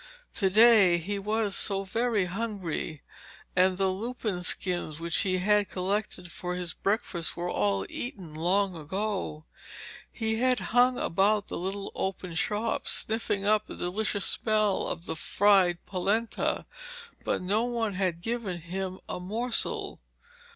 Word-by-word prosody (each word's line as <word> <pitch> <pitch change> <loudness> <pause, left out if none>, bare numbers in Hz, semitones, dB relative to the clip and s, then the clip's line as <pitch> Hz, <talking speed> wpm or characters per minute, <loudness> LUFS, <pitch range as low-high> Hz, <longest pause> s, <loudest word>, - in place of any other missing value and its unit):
To 195 -3 +2
day 210 -4 +7
he 200 +4 -3
was 210 0 0
so 195 -1 0
very 225 0 0
hungry, 185 -6 -4 0.5
and 185 0 +4
the 190 0 +2
lupin 215 -2 -3
skins 175 -4 0
which 170 0 +1
he 185 -3 +2
had 205 +2 +2
collected 185 -1 -2
for 180 -1 -4
his 180 -2 -3
breakfast 195 -4 -1
were 175 +1 -2
all 100 -2 +1
eaten 195 - -5
long 185 +4 +1
ago. 180 -1 -3 0.7
He 220 -1 -1
had 255 +1 +2
hung 245 +1 +5
about 200 +4 +2
the - - -3
little 195 +2 -4
open 190 -2 -3
shops, 220 +3 0
sniffing 220 -3 0
up 215 0 +3
the - - -8
delicious 205 +2 -1
smell 215 -3 +1
of 170 - -4
fried 190 -4 +4
polenta, 205 +4 -1 0.6
but - - -1
no 210 +5 +1
one 230 -4 -1
had 185 -3 -1
given 225 -7 -3
him 185 +2 -4
a - - -4
morsel. 225 +6 0
195 Hz, 135 wpm, -28 LUFS, 180-215 Hz, 0.7 s, day